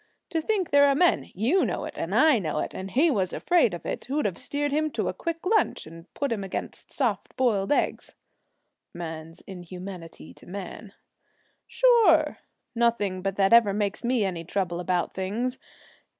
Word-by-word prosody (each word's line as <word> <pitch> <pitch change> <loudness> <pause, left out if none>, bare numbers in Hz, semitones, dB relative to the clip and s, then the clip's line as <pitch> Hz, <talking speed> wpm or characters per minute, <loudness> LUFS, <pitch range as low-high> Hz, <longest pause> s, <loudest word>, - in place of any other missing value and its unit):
To 325 -2 0
think 385 0 -1
there 285 0 +6
are 280 - +3
men 350 +4 +2
you 250 - +2
know - - -2
it - - -7
and - - -3
I 310 -7 +5
know 155 -5 -3
it - - -2
and 190 +1 -6
he 300 - +3
was 190 -7 0
afraid 330 - +2
of 175 - -10
it - - -4
who'd 290 +4 -1
have 190 - -2
steered 290 0 -2
him 310 +2 +1
to - - -1
a - - -3
quick 335 0 -5
lunch 435 +3 +1
and 165 +2 -13
put 280 -3 -2
him 210 -4 -2
against 190 - -6
soft 225 -8 -2
boiled 220 -5 +1
eggs!' 290 - -1 0.8
'"Man's 165 -1 -7
inhumanity 180 - -9
to - - -18
man"' 200 +2 -8 0.7
'Sure! 400 -12 +4 0.3
Nothing 230 -6 +1
but 195 0 -2
that 195 +1 +3
ever 230 -4 +6
makes 205 +1 -2
me 240 -3 +1
any 175 -3 -3
trouble 175 -1 -2
about 180 -1 -1
things. 225 +7 -3
210 Hz, 180 wpm, -26 LUFS, 185-285 Hz, 0.8 s, there